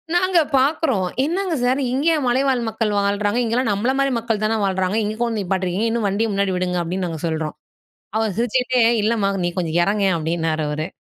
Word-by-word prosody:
நாங்க 365 -1 +3 0.2
பார்க்குறோம். 265 - +1 0.2
"என்னங்க 350 +2 -1
சார்! 255 +3 +2
இங்கயா 315 +4 +2
மலைவாழ் 260 0 +2
மக்கள் 220 -1 -1
வாழ்றாங்க! 205 +3 0
இங்கல்லாம் 230 0 0
நம்மளமாரி 265 +6 +1
மக்கள் 225 -2 -2
தான 220 +1 +1
வாழ்றாங்க! 190 +1 0
இங்க 210 +1 -2
கொண்டு 230 -3 0
நிப்பாட்ருக்கீங்க! 190 +3 -1
இன்னும் 230 -2 -1
வண்டிய 210 +4 0
முன்னாடி 200 -1 0
விடுங்க." 180 0 -1
அப்பிடின்னு 180 +2 -2
நாங்க 160 -2 -5
சொல்றோம். 160 -2 -2 0.6
அவர் 220 -4 -1
சிரிச்சுக்கிட்டே, 250 +1 +1 0.2
"இல்லம்மா! 210 -2 +1 0.2
நீ - - +1
கொஞ்சம் 170 -2 -1
இறங்கேன்" 200 -1 +1
அப்பிடின்னாரு 160 -1 -1
அவரு. 155 +2 -3
210 Hz, 170 wpm, -21 LUFS, 185-250 Hz, 0.6 s, நாங்க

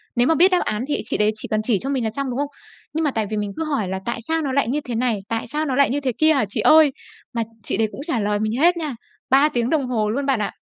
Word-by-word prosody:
Nếu 240 +1 +3
mà 325 - +3
biết 360 +4 +5
đáp 365 - +4
án 215 +2 -2
thì 290 - 0
chị - - -2
đấy 210 0 +3
chỉ 215 - -8
cần 215 0 +1
chỉ 215 -3 +1
cho 270 - -5
mình 265 -3 0
là 220 - 0
xong, 275 -1 -2
đúng 245 - -3
không? 285 - 0 0.5
Nhưng 320 +1 0
mà 295 - +1
tại 220 -4 -1
vì 215 - -2
mình 205 -1 -2
cứ - - -1
hỏi 280 -10 -1
là 190 +1 -3
"Tại 235 0 -2
sao 325 0 +1
nó 275 -4 -2
lại 280 -3 +2
như 285 +5 -1
thế 245 -4 -5
này? 235 -2 0
Tại 225 0 -2
sao 300 +5 -2
nó 270 -4 -1
lại 280 +1 +4
như 280 - 0
thế 270 -3 -1
kia 315 0 +5
hả 270 -7 +2
chị - - -4
ơi?" 310 -2 +6 0.4
mà 230 -1 0 0.2
chị - - -2
đấy 220 0 +2
cũng - - -8
trả 255 -8 0
lời 205 0 0
mình 215 0 -1
hết 345 +2 +5
nha. 305 -6 -3 0.3
3 275 +3 +5
tiếng 240 -3 -1
đồng 285 -4 +1
hồ 220 -4 0
luôn 275 +6 -1
bạn 270 -4 +1
ạ. 210 - -1
255 Hz, 325 wpm, -22 LUFS, 220-295 Hz, 0.5 s, ơi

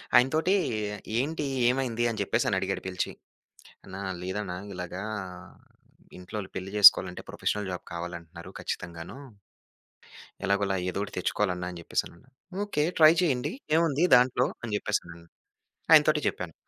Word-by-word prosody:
ఆయన 125 +1 +7
తోటి, 170 +5 +2 0.7
"ఏంటి, 150 +2 -2 0.2
ఏమైంది" 125 -3 0
అని 110 -2 -4
చెప్పేసి 100 - 0
అని - - +1
అడిగాడు - - -2
పిలిచి. 90 -1 -2 0.7
అన్న, 95 - -10 0.3
లేదన్న 95 0 -4 0.2
ఇలాగ 90 0 -6 1.2
ఇంట్లో 90 +4 -6 0.2
పెళ్లి 95 +1 -5
చేసుకోవాలంటే, 95 -2 +7
ప్రొఫెషనల్ 105 -2 -2
జాబ్ 90 - -5
కావాలంటున్నారు 85 0 -7
ఖచ్చితంగాను. 85 +6 -6 1.3
ఎలాగోలా 100 -1 +1
ఏదో 100 - -3
ఒకటి - - -10
తెచ్చుకోవాలన్నా 90 -1 -1
అని 85 - -8
చెప్పేసాన్నాను. 85 +8 -4 0.4
"ఓకే. 150 -7 0 0.2
ట్రై 155 +1 +9
చేయండి, 130 -7 0 0.3
ఏముంది 165 +1 +2
దాంట్లో" 125 +1 +3 0.2
అని 110 -3 -3
చెప్పేసాన్నారు. 85 -5 -4 0.6
ఆయన 155 -1 +10
తోటే 150 -1 +3
చెప్పాను. 85 -3 -5
100 Hz, 125 wpm, -28 LUFS, 90-130 Hz, 1.3 s, ఆయన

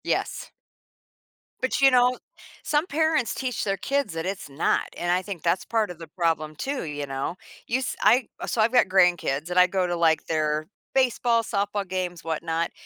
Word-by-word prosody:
Yes. - - -2 1.1
But 260 - 0
you 270 -1 +6
know, 250 0 +4 0.5
some 300 +4 +1
parents 310 - +1
teach 250 -5 -2
their 195 -1 -1
kids 280 -5 -1
that 165 0 -4
it's 190 -5 -4
not, 140 +4 0
and 175 0 -1
I 180 +1 +2
think 190 -3 -7
that's 170 +2 +1
part 220 -4 0
of 170 - -11
the 165 - -9
problem, 155 -2 -1
too, 275 - -3
you 145 -2 -4
know? 135 +4 -3 0.3
You 250 - +1
s 260 - -3
I 245 0 +4 0.2
so 225 - 0
I've 220 +1 +3
got 245 - +5
grandkids, 175 -5 +2
and 180 - +3
I 180 - +7
go 185 0 0
to, 175 -1 -1
like, 165 -2 +2
their 155 -1 0 0.3
baseball, 240 -3 +2
softball 205 -1 -2
games, 180 -2 -3
whatnot. 165 +1 -2
185 Hz, 185 wpm, -25 LUFS, 165-245 Hz, 1.1 s, I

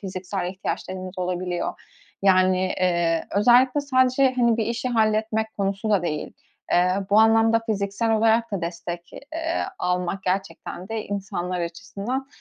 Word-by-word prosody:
fiziksel 185 -1 -4
ihtiyaçlarımız 185 0 -5
olabiliyor. 180 -1 -2 0.4
Yani, 185 -1 +4 0.2
eee, 170 -2 +1
özellikle 250 +7 +4
sadece, 260 -1 +3
hani, 235 -2 +3
bir 220 - -1
işi 235 +2 -2
halletmek 220 -1 0
konusu 195 +2 -1
da 195 -4 +3
değil. 150 -3 -3 0.4
Eee, 180 +1 +4 0.2
bu 210 - +5
anlamda 225 +1 +5
fiziksel 200 +1 -1
olarak 225 0 +2
da 185 -3 -2
destek, 170 0 -5
eee, 325 +3 -3
almak 180 +1 -1
gerçekten 185 0 -3
de 225 -1 -3
insanlar 185 -3 -3
açısından, 200 +9 -4
200 Hz, 130 wpm, -24 LUFS, 180-225 Hz, 0.4 s, bu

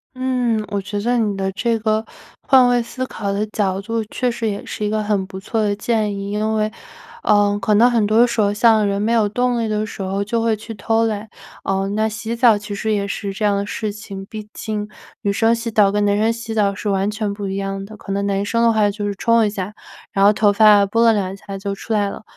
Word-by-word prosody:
嗯， 250 -4 0
我 200 -1 -2
觉 205 +2 -4
得 245 +3 +1
你 215 -3 0
的 195 0 -1
这 230 +4 0
个 215 0 0 0.4
换 260 -2 +5
位 245 0 +3
思 255 +2 -5
考 205 -5 -4
的 200 +2 -1
角 195 -3 -1
度 225 +2 -2
确 245 +3 -1
实 230 -1 -2
也 200 - -5
是 - - -5
一 - - 0
个 215 0 -1
很 205 -2 0
不 190 0 -8
错 220 +3 -2
的 205 -1 +1
建 210 -1 -1
议。 200 0 -5
因 215 +1 -1
为， 215 0 0 0.5
呃， 205 -1 +3
可 210 +1 +2
能 235 +4 +6
很 230 -3 +2
多 220 +3 +5
时 235 -2 0
候 200 -1 +2
像 215 0 +4
人 200 0 -1
没 220 +2 0
有 220 -3 +3
动 245 +2 0
力 225 - -1
的 215 0 -1
时 205 - -8
候 195 +1 -1
就 230 +3 -1
会 225 -1 +2
去 220 +1 -9
偷 225 +2 0
懒， 215 -1 -3 0.3
呃， 195 0 -1
那 215 +2 0
洗 220 +2 -4
澡 235 -3 +5
其 205 0 -7
实 215 +2 -1
也 200 -1 -1
是 200 0 -4
这 210 +2 -2
样 205 -1 +3
的 200 - -2
事 215 0 -3
情， 200 -2 -8
毕 215 +1 -9
竟 210 -1 -4 0.3
女 200 - 0
生 225 +3 +3
洗 230 0 -2
澡 210 -3 +4
跟 205 0 +1
男 205 0 +2
生 220 +2 +2
洗 230 -1 -6
澡 200 -2 +2
是 205 +1 -4
完 195 0 +1
全 215 -1 -2
不 200 -1 -5
一 190 - -3
样 195 0 -3
的。 215 +2 -11
可 195 - -8
能 200 +1 -1
男 200 0 0
生 230 +3 0
的 230 - +5
话 215 -2 +3
就 205 +1 -4
是 205 - -1
冲 230 +2 +3
一 - - +1
下， 200 0 -5 0.4
然 195 0 +3
后 205 - +6
头 210 0 +3
发 205 -1 +6
拨 230 +4 +2
拉 230 - +7
两 195 -3 -1
下 195 -1 -8
就 200 0 -3
出 225 - -5
来 205 -2 +1
了。 - - -8
210 Hz, 280 characters per minute, -20 LUFS, 200-225 Hz, 0.5 s, 拉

